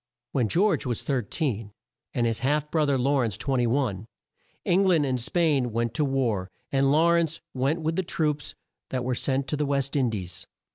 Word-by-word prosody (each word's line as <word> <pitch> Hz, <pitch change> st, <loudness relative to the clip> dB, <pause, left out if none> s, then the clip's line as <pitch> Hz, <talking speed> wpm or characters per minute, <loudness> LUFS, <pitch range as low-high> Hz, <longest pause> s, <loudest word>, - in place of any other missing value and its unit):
When 125 Hz, -5 st, +1 dB
George 200 Hz, -, +2 dB
was 120 Hz, -3 st, -2 dB
13 120 Hz, -4 st, -2 dB, 0.4 s
and 120 Hz, -, +2 dB
his 115 Hz, -1 st, 0 dB
half 145 Hz, +4 st, 0 dB
bro 155 Hz, -2 st, +2 dB
ther 140 Hz, -1 st, +2 dB
Law 135 Hz, +2 st, +2 dB
rence 110 Hz, -5 st, 0 dB
21, 120 Hz, -5 st, 0 dB, 0.6 s
Eng 185 Hz, +3 st, +3 dB
land 165 Hz, -5 st, +4 dB
and 130 Hz, -2 st, -1 dB
Spain 145 Hz, -4 st, +1 dB
went 115 Hz, +1 st, -1 dB
to 150 Hz, -, +1 dB
war, 120 Hz, -9 st, 0 dB, 0.2 s
and 135 Hz, 0 st, +3 dB
Law 165 Hz, +3 st, +4 dB
rence 165 Hz, -2 st, +1 dB
went 140 Hz, +6 st, 0 dB
with 160 Hz, +1 st, -1 dB
the -, -, +3 dB
troops 150 Hz, -4 st, -2 dB, 0.3 s
that 130 Hz, -1 st, -2 dB
were 125 Hz, +1 st, 0 dB
sent 135 Hz, +2 st, 0 dB
to 150 Hz, -, 0 dB
the 150 Hz, -, 0 dB
West 140 Hz, -1 st, 0 dB
In 130 Hz, -4 st, +2 dB
dies. 95 Hz, -5 st, -4 dB
135 Hz, 190 wpm, -26 LUFS, 120-150 Hz, 0.6 s, land